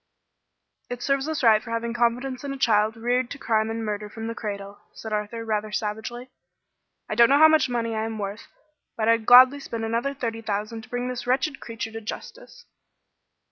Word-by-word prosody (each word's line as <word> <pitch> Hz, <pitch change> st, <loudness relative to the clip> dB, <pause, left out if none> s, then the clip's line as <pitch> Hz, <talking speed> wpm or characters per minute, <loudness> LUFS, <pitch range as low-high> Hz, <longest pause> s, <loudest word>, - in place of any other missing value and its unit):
"It 245 Hz, 0 st, -5 dB
serves 275 Hz, +1 st, 0 dB
us 315 Hz, -4 st, -3 dB
right 220 Hz, -2 st, +6 dB
for 230 Hz, -, -11 dB
having 230 Hz, 0 st, -2 dB
confidence 245 Hz, +2 st, 0 dB
in 280 Hz, -, -4 dB
a 275 Hz, -, -5 dB
child 220 Hz, -3 st, +2 dB
reared 245 Hz, +2 st, 0 dB
to -, -, -7 dB
crime 220 Hz, -4 st, 0 dB
and 225 Hz, 0 st, -3 dB
murder 210 Hz, 0 st, -4 dB
from 225 Hz, +1 st, -7 dB
the 230 Hz, -, -3 dB
cradle," 200 Hz, -3 st, -6 dB
said 220 Hz, -1 st, -7 dB
Arthur, 210 Hz, +2 st, -3 dB
rather 215 Hz, -1 st, -2 dB
savagely. 220 Hz, +4 st, -4 dB, 0.8 s
"I -, -, -3 dB
don't 235 Hz, +2 st, +6 dB
know 280 Hz, -, +5 dB
how 315 Hz, +2 st, +8 dB
much 315 Hz, -4 st, +3 dB
money 230 Hz, -2 st, -1 dB
I 220 Hz, 0 st, -1 dB
am 225 Hz, -1 st, -5 dB
worth, 205 Hz, +1 st, -5 dB, 0.5 s
but 220 Hz, -1 st, 0 dB
I'd 230 Hz, -1 st, +2 dB
gladly 255 Hz, +3 st, +8 dB
spend 230 Hz, -4 st, -5 dB
another 235 Hz, +5 st, -1 dB
thirty 230 Hz, -4 st, -4 dB
thousand 215 Hz, +1 st, -3 dB
to 220 Hz, -, -16 dB
bring 245 Hz, 0 st, -3 dB
this 250 Hz, -1 st, -5 dB
wretched 270 Hz, +3 st, 0 dB
creature 230 Hz, -1 st, -6 dB
to 225 Hz, 0 st, -7 dB
justice." 485 Hz, -, -9 dB
230 Hz, 200 wpm, -25 LUFS, 220-250 Hz, 0.8 s, how